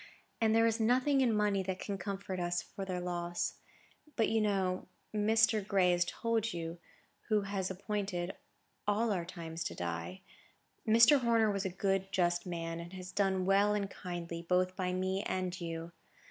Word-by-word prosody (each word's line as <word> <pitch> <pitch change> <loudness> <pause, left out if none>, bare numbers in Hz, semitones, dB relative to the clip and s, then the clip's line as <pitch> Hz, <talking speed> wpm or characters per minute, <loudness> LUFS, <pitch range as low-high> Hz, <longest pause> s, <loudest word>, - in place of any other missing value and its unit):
and 220 0 +4
there 225 0 +5
is 225 0 +2
nothing 255 +5 +3
in 250 -3 +3
money 210 -2 +2
that 190 0 -3
can 200 +1 -4
comfort 195 -1 -4
us 175 0 0
for 195 - -7
their 185 -1 -2
loss. 175 -1 -2 0.6
But 225 - +2
you 225 0 +2
know—Mr. 210 +3 +1
Gray 190 -3 +4
has 175 0 +2
told 225 +2 -1
you—who 170 +5 -4
has 195 -1 -2
appointed 195 -2 -3 0.5
all 215 +2 +2
our 180 -4 -1
times 165 -2 -6
to - - -3
die. 85 +1 -4 0.7
Mr. 230 +6 +7
Horner 230 -3 +3
was 200 0 -2
a - - +1
good, 195 +1 -1
just 175 -2 +1
man; 165 -1 -3
and 170 +2 -8
has 185 -1 -7
done 190 -2 +1
well 200 +2 +4
and 200 -1 -2
kindly, 170 -2 -5
both 180 +2 +1
by 180 -1 -1
me 185 +1 0
and 185 -2 -2
you. 165 0 -5
190 Hz, 165 wpm, -33 LUFS, 175-210 Hz, 0.7 s, Mr